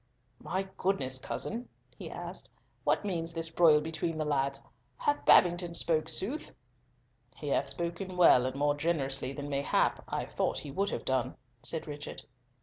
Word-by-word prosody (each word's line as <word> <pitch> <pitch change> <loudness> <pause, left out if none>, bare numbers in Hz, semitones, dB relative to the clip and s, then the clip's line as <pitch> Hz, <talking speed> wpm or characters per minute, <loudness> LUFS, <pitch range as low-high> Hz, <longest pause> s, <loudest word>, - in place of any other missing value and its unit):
"My 190 +1 -2
good 195 +1 +2 0.2
cousin," 235 - -4 0.3
he - - -8
asked, - - -7 0.3
"what - - +1
means 165 -4 -2
this 165 0 -2
broil 160 -3 +6
between 160 +1 -2
the 155 - -1
lads? 140 -1 0 0.3
Hath 290 0 0
Babington 175 -1 +5
spoken 155 -2 +2
sooth?" 250 - 0 0.9
"He - - -5
hath - - +1
spoken 175 +2 -4
well 130 -8 +6
and 130 - -4
more 145 +1 +2
generously 135 -4 0
than, 145 +1 -6
mayhap, 140 -1 +1
I - - -2
thought - - -1
he 145 - -6
would 200 +8 0
have - - -4
done," 130 -1 0 0.3
said 160 +5 -1
Richard. 145 -1 -7
160 Hz, 155 wpm, -31 LUFS, 145-175 Hz, 0.9 s, broil